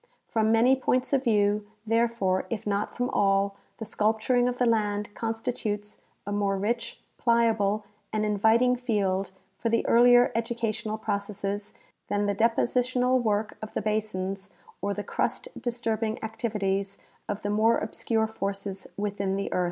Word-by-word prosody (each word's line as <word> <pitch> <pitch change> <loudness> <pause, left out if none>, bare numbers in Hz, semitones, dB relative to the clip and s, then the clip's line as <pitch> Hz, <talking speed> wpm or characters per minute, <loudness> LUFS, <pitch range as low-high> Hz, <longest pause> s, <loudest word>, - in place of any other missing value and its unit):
From 220 -1 +1
many 235 +4 +5
points 255 0 0
of 270 -1 +3
view, 205 -2 +2 0.2
therefore, 225 -4 +1
if 230 -3 -4
not 205 0 -1
from 245 +1 0
all, 195 0 +2 0.2
the 220 - -6
sculpturing 220 +4 +1
of 250 0 -1
the 250 - +2
land 210 -3 0
constitutes 225 -2 -3 0.3
a 205 - -4
more 200 -1 +1
rich, 230 +4 -2 0.2
pliable, 220 -3 +2 0.3
and 215 0 0
inviting 220 +4 +3
field 200 -6 0 0.3
for 230 - 0
the 230 - +1
earlier 245 +1 +6
educational 230 -1 -2
processes 205 -1 -3 0.3
than 205 0 0
the 205 - +1
depositional 250 +3 +2
work 215 -1 -1
of 215 - -8
the - - 0
basins 200 -2 -2 0.3
or 200 0 -1
the 205 - -3
crust - - -2
disturbing 225 -2 -1
activities 205 -3 -2 0.3
of 205 0 -3
the 205 - -1
more 220 +2 +4
obscure 220 +1 -1
forces 200 -2 -4
within 200 -1 -1
the 200 0 -3
earth. - - +1
215 Hz, 145 wpm, -27 LUFS, 205-230 Hz, 0.3 s, earlier